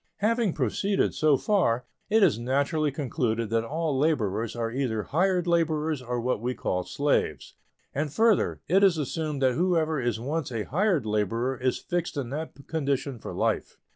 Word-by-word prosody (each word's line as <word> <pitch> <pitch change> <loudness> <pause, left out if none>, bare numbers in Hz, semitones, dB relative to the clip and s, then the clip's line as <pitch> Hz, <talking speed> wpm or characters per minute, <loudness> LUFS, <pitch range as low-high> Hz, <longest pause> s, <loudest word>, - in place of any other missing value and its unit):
Having 225 -2 +1
proceeded 175 - 0
so 150 -3 +3
far, 125 - +1 0.2
it 220 0 +4
is 155 - +4
naturally 140 +5 0
concluded 120 -6 -2
that 115 0 +2
all 155 +4 -2
laborers 115 -8 0
are 115 -1 -2
either 120 -4 -1
hired 180 +3 +1
laborers 160 -4 +1
or 125 0 -3
what 120 -2 -1
we 125 +1 -2
call 90 0 -1
slaves. 145 +9 -1 0.4
And 145 +1 -2
further, 220 +5 +2
it 190 +4 +4
is 190 -4 +5
assumed 150 -1 -2
that 130 -1 +4
whoever 160 -2 +1
is 120 -2 -1
once 145 +3 -3
a 115 -3 -2
hired 175 - +1
laborer 110 +5 0
is 130 0 0
fixed 175 -3 -3
in 130 -3 -3
that 155 +3 -5
condition 140 -4 -1
for - - -7
life. - - -1
140 Hz, 170 wpm, -27 LUFS, 120-165 Hz, 0.4 s, is